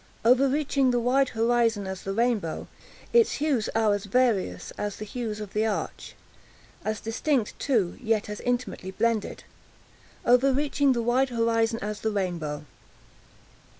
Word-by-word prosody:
Overreaching 270 +2 +3
the 245 -1 +2
wide 255 +3 +2
horizon 230 -2 +1
as 190 -1 -5
the 195 - -4
rainbow, 220 -6 0 0.5
its 465 -2 +5
hues 285 -7 0
are 220 -2 +3
as 205 0 -3
various 200 - +1
as 205 -1 -4
the 215 - -7
hues 215 -1 -4
of 210 -2 -7
that 215 - +1
arch—as 215 0 -6
distinct 225 +1 -1
too, 220 -11 0
yet 220 -3 0
as 210 0 -6
intimately 245 -6 -2
blended. 220 +2 -1 0.8
Overreaching 275 +2 +3
the 235 -1 -1
wide 255 +3 +2
horizon 230 -1 +1
as 210 0 -4
the 220 - 0
rainbow! 170 -7 -3
230 Hz, 135 wpm, -26 LUFS, 210-250 Hz, 0.8 s, its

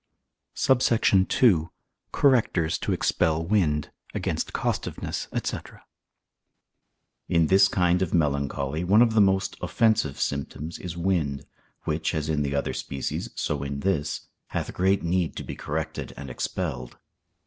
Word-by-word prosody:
SUBSECT. 115 -7 +3
II.—Correctors 90 - +2
to - - -2
expel 80 0 +1
Wind. 80 -7 +1 0.2
Against - - -2
Costiveness, - - -3 0.2
&c. - - -2 1.7
In 85 -1 +4
this 95 +4 +6
kind 90 0 +2
of 95 - 0
melancholy 70 -1 0
one 100 +6 +6
of 115 -2 +1
the 110 - +5
most 95 -1 +2
offensive 110 -11 +1
symptoms 70 +3 -3
is 85 -2 -6
wind, 85 -6 0 0.4
which, 80 +1 -1
as 75 0 -2
in 75 -2 +1
the 70 0 -1
other 70 - -1
species, 70 -1 -4
so 75 -2 -2
in 70 0 -4
this, 80 -5 0 0.3
hath - - -4
great 95 +2 +2
need 85 0 0
to - - -5
be - - -6
corrected 80 +1 -4
and 70 -2 -7
expelled. - - -4
80 Hz, 130 wpm, -26 LUFS, 75-95 Hz, 1.7 s, this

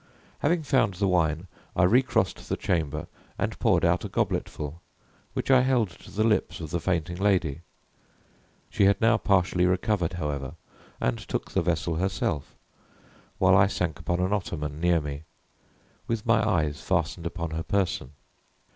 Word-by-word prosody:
Having 160 +2 +1
found 130 -8 +2
the 100 +2 +1
wine, 85 -2 +1 0.3
I 95 - +3
recrossed 125 +8 +2
the - - 0
chamber, 75 -3 -1 0.3
and - - -2
poured - - +3
out - - +2
a - - -4
gobletful, 75 +3 -2 0.5
which - - -1
I 130 -1 +7
held 125 -6 +2
to 85 - -15
the 110 - 0
lips 110 -3 +1
of 80 -3 -6
the 85 - 0
fainting 85 -1 -1
lady. 90 -6 +1 1.1
She 100 - +3
had 100 0 +4
now 115 0 +4
partially 90 -3 +2
recovered, 90 -1 0
however, 75 -4 -3 0.4
and 60 -1 0
took - - -4
the - - +1
vessel 85 -1 -1
herself, 90 -5 -2 0.8
while 95 0 +5
I 95 +1 +6
sank 90 -4 -2
upon 85 +2 -1
an 95 +2 +1
ottoman 75 -7 -3
near 85 -1 +3
me, 75 0 -5 0.9
with 115 0 -2
my 115 -2 +3
eyes 75 -7 0
fastened 85 -1 -1
upon 85 -2 -4
her 80 +1 -2
person. 90 - -1
90 Hz, 155 wpm, -27 LUFS, 80-100 Hz, 1.1 s, I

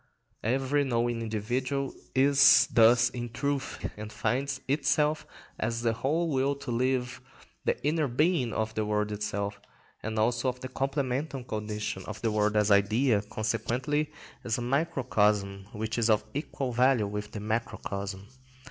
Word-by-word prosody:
Every 135 +5 +1
knowing 120 -2 0
individual 125 +5 -2 0.2
is 140 +1 +6
thus 120 +1 +6
in 120 -1 -5
truth, 140 +3 -3
and 105 0 -7
finds 135 +3 -1
itself 150 +2 +1 0.3
as 115 +2 -2
the 115 -1 +2
whole 155 +8 0
will 135 +1 +1
to 140 -2 -6
live, 125 +1 0
or 135 - -26 0.3
the - - -1
inner 155 0 +2
being 135 0 +1
of 110 0 -2
the 110 - -1
world 105 0 0
itself, 100 0 -3 0.4
and 110 +1 -4
also 120 +3 +2
as 125 - -15
the 130 0 -7
complemental 135 0 -2
condition 105 -4 -4
of 105 0 -6
the 115 - +2
world 105 0 +1
as 105 0 +3
idea, 105 +3 +3
consequently 120 +8 -1 0.3
as 115 -2 -1
a 120 - -3
microcosm 105 -8 +1
which 110 +1 -3
is 115 0 +2
of 105 -1 +4
equal 140 -2 -3
value 125 -2 +3
with 105 +1 -5
the 105 - -5
macrocosm. 105 -3 -3
120 Hz, 150 wpm, -29 LUFS, 105-135 Hz, 0.4 s, is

